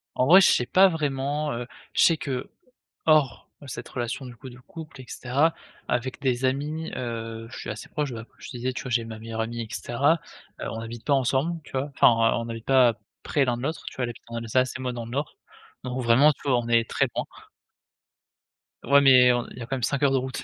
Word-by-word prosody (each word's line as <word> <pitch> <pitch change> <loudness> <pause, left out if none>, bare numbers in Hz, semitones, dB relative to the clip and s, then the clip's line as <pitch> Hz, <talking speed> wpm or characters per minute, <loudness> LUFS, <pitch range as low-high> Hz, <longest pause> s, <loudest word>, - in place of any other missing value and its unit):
En 125 - +2
vrai, 185 +4 +9
je - - +6
sais 125 - +2
pas 190 +9 +5
vraiment, 145 -2 -2
heu, 120 +1 -5 0.3
je - - +2
sais 165 -2 +5
que 130 -4 -4 0.6
hors 150 -6 +3 0.2
cette 120 -1 -7
relation 125 +2 -4
du 125 -1 -9
coup 130 +3 -10
de 125 - -13
couple 155 0 -11
et - - -12
cetera, 140 +8 +1 0.3
avec 125 +1 -2
des 130 -1 0
amis, 150 +5 -2
heu, 115 -2 -5
je - - -8
suis - - -6
assez 105 -1 -7
proche 150 -3 -2
bah 115 -2 -6
comme - - -34
je - - -10
te 125 - -7
disais 130 +2 -2
tu - - -5
vois? 130 - -6
J'ai 115 -1 +1
ma 110 -1 -8
meilleure 115 0 -4
amie 115 +1 -3
et 115 - -6
cetera, 135 +7 +1 0.4
heu, - - -3
on 115 - -5
n'habite 115 0 -8
pas 145 - +2
ensemble 140 +6 +1
tu - - -15
vois? 135 +2 -2
Enfin - - +7
on 115 0 +2
on - - -8
habite 115 -1 -7
pas 130 -3 +5 0.3
près 140 -3 +1
l'un 120 - 0
de - - -7
l'autre, 160 +3 -3
tu - - -7
vois? 130 - -2
Elle 120 - -1
habite 120 - -10
en 115 - -8
Alsace 120 +3 0
et - - -8
moi 125 -1 -2
dans 120 -1 -5
le 115 - -9
Nord, 145 +4 -3 0.5
donc 125 0 -3
vraiment 130 +6 +6
tu - - -11
vois? 130 -3 +4
On 120 -1 -2
est 115 -1 +3
très - - +2
loin. - - -1 1.6
Ouais, 140 0 +5
mais 125 -2 +7
on 120 -1 -2
il - - -12
y - - -7
a 115 - -4
quand 135 - -2
même 130 - -5
5 140 +3 0
heures 140 - +4
de 135 - +3
route. 130 0 -4
125 Hz, 255 wpm, -25 LUFS, 120-140 Hz, 1.6 s, vrai